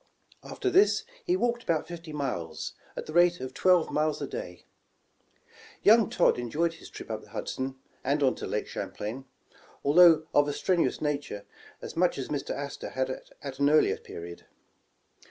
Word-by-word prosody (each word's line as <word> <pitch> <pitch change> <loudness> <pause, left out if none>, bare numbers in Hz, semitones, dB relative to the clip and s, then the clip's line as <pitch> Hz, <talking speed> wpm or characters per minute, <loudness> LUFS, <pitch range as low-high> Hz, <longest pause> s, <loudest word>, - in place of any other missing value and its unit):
After 385 - -2
this 400 +3 +4 0.2
he 360 +1 +2
walked 240 -6 0
about 160 -7 -1
fifty 170 -2 -8
miles, 125 - -4 0.2
at - - -4
the 155 - -8
rate 175 +1 +4
of 130 0 -6
twelve 180 0 +3
miles 155 0 0
a - - -2
day. - - -7 1.2
Young 220 +1 +6
Todd - - +3
enjoyed 155 +8 0
his 165 - -13
trip - - -9
up - - -3
the - - -17
Hudson 130 0 -4 0.3
and 140 +2 +1
on 130 - +4
to - - -5
Lake - - -2
Champlain, 120 +6 -5 0.6
although 160 +1 +7
of 145 0 +4
a 145 - -1
strenuous 175 +2 +1
nature, 145 -9 -3 0.4
as - - -7
much 180 +1 +2
as 135 - -4
Mr. 145 -2 -3
Astor 140 0 -4
had 130 0 -1 0.3
at 140 -1 -6
an 140 0 +4
earlier 155 +1 +4
period. 85 0 -10
150 Hz, 170 wpm, -28 LUFS, 135-175 Hz, 1.2 s, although